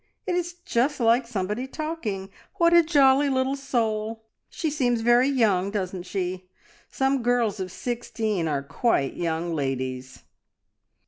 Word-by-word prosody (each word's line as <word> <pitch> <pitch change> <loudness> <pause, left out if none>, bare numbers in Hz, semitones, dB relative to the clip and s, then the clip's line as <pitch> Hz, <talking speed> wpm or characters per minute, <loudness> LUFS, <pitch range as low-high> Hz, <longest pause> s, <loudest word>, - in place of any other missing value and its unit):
"It 370 - -1
is 350 0 -1
just 275 +5 +1
like 235 +1 +3
somebody 210 +3 -3
talking. 260 -11 -4 0.2
What 340 -3 +4
a 340 - +8
jolly 285 -3 +4
little 265 0 +1
soul! 225 -5 -2 0.3
She 315 -3 -2
seems 245 -6 +1
very 240 +3 +4
young, 205 -8 +2
doesn't 185 -3 -4
she? 185 -1 -3 0.4
Some 270 0 0
girls 235 -4 +1
of 185 -1 -4
sixteen 220 -5 -2
are 145 -3 -1
quite 140 - 0
young 170 0 -2
ladies." 130 -3 -3
230 Hz, 135 wpm, -25 LUFS, 185-265 Hz, 0.4 s, a